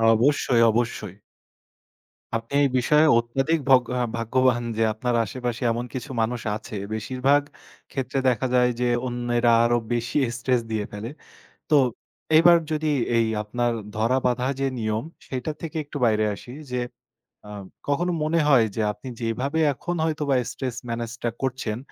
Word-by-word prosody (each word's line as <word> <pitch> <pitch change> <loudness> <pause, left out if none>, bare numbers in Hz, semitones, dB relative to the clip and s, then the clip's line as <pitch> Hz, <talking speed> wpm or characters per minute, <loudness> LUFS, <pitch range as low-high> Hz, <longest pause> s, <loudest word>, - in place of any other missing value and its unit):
অবশ্যই, 125 0 +3
অবশ্যই। 110 -4 -2 1.2
আপনি 115 +4 -5
এই - - +5
বিষয়ে 150 +5 +4
অত্যাধিক 135 +7 0
ভগ্য 125 -2 +6
আ - - +2
ভাগ্যবান 120 +1 +2
যে 115 - +3
আপনার 120 +2 -1
আশেপাশে 120 +2 -4
এমন 120 +1 -2
কিছু 130 +2 -5
মানুষ 115 +1 -1
আছে। 110 0 -8 0.2
বেশিরভাগ 130 +6 +2 0.5
ক্ষেত্রে 135 0 -2
দেখা 125 +1 0
যায় 125 0 +4
যে 125 - +2 0.2
অন্যেরা 120 -1 +1
আরো 120 0 +3 0.2
বেশি 120 +1 -1 0.2
স্ট্রেস 125 0 +1
দিয়ে 110 -2 -1
ফেলে। 105 +3 -6 0.6
তো 155 - +5 0.6
এবার 170 +1 +7
যদি 155 0 0 0.3
এই 115 -1 +3 0.2
আপনার 120 +3 -1 0.2
ধরা 115 +4 +2
বাঁধা 125 0 +1
যে 135 - +1
নিয়ম, 110 0 -1 0.2
সেটার 130 +4 -4
থেকে 165 0 -5
একটু 145 0 -7
বাইরে 110 -1 +2
আসি 120 - -12 0.2
যে, 125 0 -1 0.7
আ - - -9 0.4
কখনো 170 +5 +1
মনে 160 +2 +1
হয় 130 -6 +6
যে, 110 - 0
আপনি 105 +5 -12
যেভাবে 130 +7 -1
এখন 175 +6 -4
হয়তোবা 150 -3 0 0.2
স্ট্রেস 130 -3 -4
মেনেজটা 120 0 -3
করছেন, 125 -5 -2
125 Hz, 150 wpm, -24 LUFS, 115-135 Hz, 1.2 s, এবার